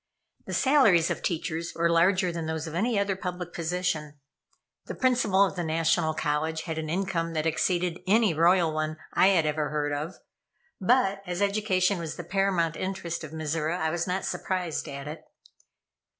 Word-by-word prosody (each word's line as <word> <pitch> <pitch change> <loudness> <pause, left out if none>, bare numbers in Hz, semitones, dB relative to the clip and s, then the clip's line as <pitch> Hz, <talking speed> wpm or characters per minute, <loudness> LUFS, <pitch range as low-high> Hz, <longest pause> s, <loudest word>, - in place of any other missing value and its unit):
The - - -3
salaries 255 - +4
of - - -3
teachers 165 -1 -3
were 170 0 +2
larger 180 +2 +3
than 165 -1 -4
those 160 0 -3
of 160 - -7
any 215 +6 0
other 200 -1 +1
public 180 -2 -5
position. 165 -3 -2 0.7
The - - -5
Principal 240 -7 +3
of 195 - -4
the 175 - -2
National 160 0 +1
College 160 +2 -1
had 160 -2 -4
an 155 -1 -4
income 170 -2 -1
that 155 -1 -1
exceeded 175 +2 0
any 215 -2 +4
royal 170 0 +3
one 155 0 -2 0.2
I - - +5
had 180 -5 +4
ever 150 -1 -1
heard 145 0 -1
of; 150 +5 -4 0.6
but, 200 -2 +2
as 180 0 -3
education 200 -2 +1
was 165 -2 -5
the 175 - -6
paramount 175 -3 0
interest 175 -3 -4
of 155 - -6
Mizora, 160 +1 -2
I 160 -2 0
was 170 +2 -2
not 185 +1 -1
surprised 180 -4 -2
at 140 0 -7
it. 155 +2 -7
170 Hz, 175 wpm, -27 LUFS, 160-190 Hz, 0.7 s, I